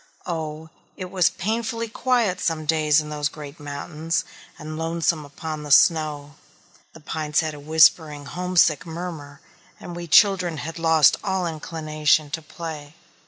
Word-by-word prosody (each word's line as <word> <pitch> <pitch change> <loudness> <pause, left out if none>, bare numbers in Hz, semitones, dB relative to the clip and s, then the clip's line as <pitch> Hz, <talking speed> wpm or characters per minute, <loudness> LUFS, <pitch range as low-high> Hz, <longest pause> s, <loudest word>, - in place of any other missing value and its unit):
Oh, 160 -2 -5 0.3
it 185 -2 -7
was 185 -3 +3
painfully 230 +3 -3
quiet 230 -5 0
some 160 -3 -1
days 155 -1 +3
in 150 0 -8
those 150 0 -1
great 150 0 -10
mountains, 155 +3 -3 0.3
and 155 +1 -7
lonesome 165 0 -1
upon 155 +2 -6
the 150 - -8
snow. 150 -1 +3 0.6
The - - -13
pines 155 0 -1
had 155 -1 -3
a 150 - -9
whispering 155 0 +3
homesick 175 -1 +2
murmur, 160 -4 -7 0.4
and 175 - -8
we 175 0 -6
children 185 -2 +4
had 165 +3 -6
lost 160 -3 +5
all 190 -3 -1
inclination 155 -2 0
to 160 +1 -3
play. 155 -1 -8
160 Hz, 145 wpm, -23 LUFS, 150-175 Hz, 0.6 s, lost